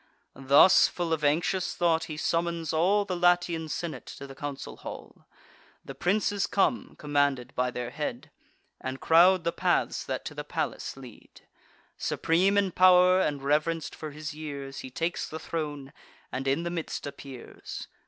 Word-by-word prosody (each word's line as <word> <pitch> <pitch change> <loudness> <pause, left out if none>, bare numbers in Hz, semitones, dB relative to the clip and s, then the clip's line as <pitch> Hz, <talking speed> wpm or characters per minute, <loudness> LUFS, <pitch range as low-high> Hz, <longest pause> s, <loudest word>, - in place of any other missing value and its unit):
Thus, 140 +7 +6
full 170 -2 -2
of 155 -2 -2
anxious 170 +5 +1
thought, 165 -2 +2
he 155 -2 -7
summons 165 0 -1
all 195 +6 +3
The 185 - -3
Latian 175 -2 +2
senate 170 +1 -5
to 140 - -8
the 135 - -10
council 140 0 -6
hall. - - -10 0.6
The - - -7
princes 200 +1 0
come, 220 +5 0
commanded 145 -4 0
by 125 0 0
their 125 -1 -5
head, 145 0 -5 0.5
And 130 0 -5
crowd 175 +2 +5
the 170 - 0
paths - - 0
that - - -4
to - - -5
the - - -5
palace - - -4
lead. 125 -4 -14 0.6
Supreme 185 +5 +2
in 200 -2 +2
pow'r, 185 0 +6
and 145 -5 -1
reverenc'd 155 +3 0
for 155 - -7
his 150 +1 -7
years, 140 -3 -7
He 130 - -7
takes 165 +7 -2
the 160 - -5
throne, 145 -5 -5 0.4
and 135 +1 -3
in 140 +5 +1
the 170 - -3
midst 170 -2 -4
appears. 135 -3 -8
160 Hz, 160 wpm, -28 LUFS, 140-175 Hz, 0.6 s, Thus